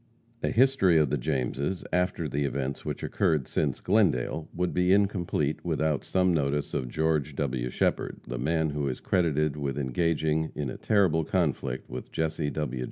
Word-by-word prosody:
A - - 0
history 125 -8 +4
of 75 -4 +3
the 75 - +2
Jameses, 70 +8 -2
after 90 -2 0
the 70 0 -1
events 70 -1 -2
which - - -4
occurred 75 -5 +1
since - - -1
Glendale, 80 - +1
would 90 0 -1
be 90 0 +2
incomplete 95 -7 +1
without 80 -3 0
some 90 -1 +2
notice 70 -2 0
of 65 - -1
George 75 -1 0
W. 65 -4 -1
Shepherd, - - 0
the - - -4
man 80 +3 +1
who 75 -1 -2
is 65 - -3
credited 75 -5 +1
with 70 -2 -2
engaging 80 +3 0
in 70 -4 -3
a - - -7
terrible 95 -7 +2
conflict 70 -7 -1
with 65 +1 -7
Jesse 80 -2 -1
W. 75 -4 -3
75 Hz, 165 wpm, -28 LUFS, 70-85 Hz, -, history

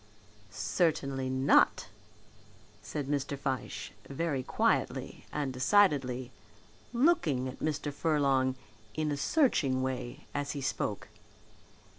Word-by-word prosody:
"Certainly 135 - 0
not," 130 -7 +3 0.9
said 145 -3 -4
Mr. 140 0 -2
Fyshe, 135 -2 -3 0.2
very 140 -1 -1
quietly - - 0
and 145 -3 -2
decidedly, 130 -5 +3 0.6
looking 235 - +2
at 130 - -7
Mr. 150 -1 -2
Furlong 140 -4 +2 0.4
in 155 -1 0
a - - 0
searching 140 - +2
way 130 -2 -4
as 145 0 -2
he 140 - -4
spoke. 120 -6 -2
140 Hz, 100 wpm, -31 LUFS, 130-150 Hz, 0.9 s, not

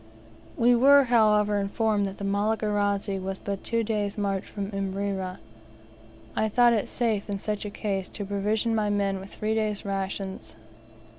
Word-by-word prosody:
We 240 +1 +5
were, 280 +4 +7
however, 215 -4 +3
informed 205 +1 0
that 195 - -7
the - - -7
Malagarazi 205 -1 0
was 190 0 -4
but 200 0 -5
two 230 -1 0
days' 210 -2 -2
march 200 -2 -1
from 200 0 -5
Imrera. 195 -1 -3 1.0
I 220 - +1
thought 240 +2 +5
it 215 - 0
safe, 220 -4 -1
in 200 - -1
such 210 +1 -3
a - - -3
case, 195 -2 -3
to 205 - -6
provision 210 +3 0
my 215 -2 +1
men 200 -1 0
with 195 +1 -11
three 215 +1 -1
days' 215 -2 -1
rations. 195 0 -4
205 Hz, 160 wpm, -26 LUFS, 195-220 Hz, 1.0 s, were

